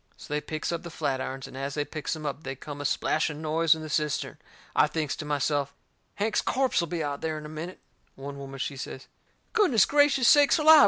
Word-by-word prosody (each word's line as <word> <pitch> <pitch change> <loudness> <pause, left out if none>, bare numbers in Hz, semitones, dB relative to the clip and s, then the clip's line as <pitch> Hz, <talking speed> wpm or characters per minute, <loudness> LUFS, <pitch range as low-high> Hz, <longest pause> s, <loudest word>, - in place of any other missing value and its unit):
So - - -8
they 150 - 0
picks 155 +2 -3
up 170 - -2
the 175 - -8
flatirons, 135 -3 -2
and - - -12
as 135 +1 -4
they 145 -1 0
picks 155 +1 -3
em 155 -1 -7
up 145 +1 -3
they 135 -2 -5
come 145 +2 -7
a - - -4
splashing 150 +1 0
noise 160 +1 +3
in 160 - -7
the - - -5
cistern. 150 -1 -1 0.4
I - - +5
thinks 155 -4 -2
to 155 - -5
myself, 145 -1 0 0.4
Hank's 215 +2 +1
corpse'll 255 -10 +1
be 165 -1 -2
out 145 -1 -1
of 140 - -8
there 160 -1 -2
in 155 - -7
a - - -7
minute. 160 +4 -6 0.4
One 140 +1 -7
woman, 135 0 -7
she 135 +1 -3
says: 130 0 -7 0.5
"Goodness 330 - +5
gracious 285 -3 +4
sakes 290 +2 +7
alive! 310 0 +8
155 Hz, 225 wpm, -28 LUFS, 140-170 Hz, 0.5 s, alive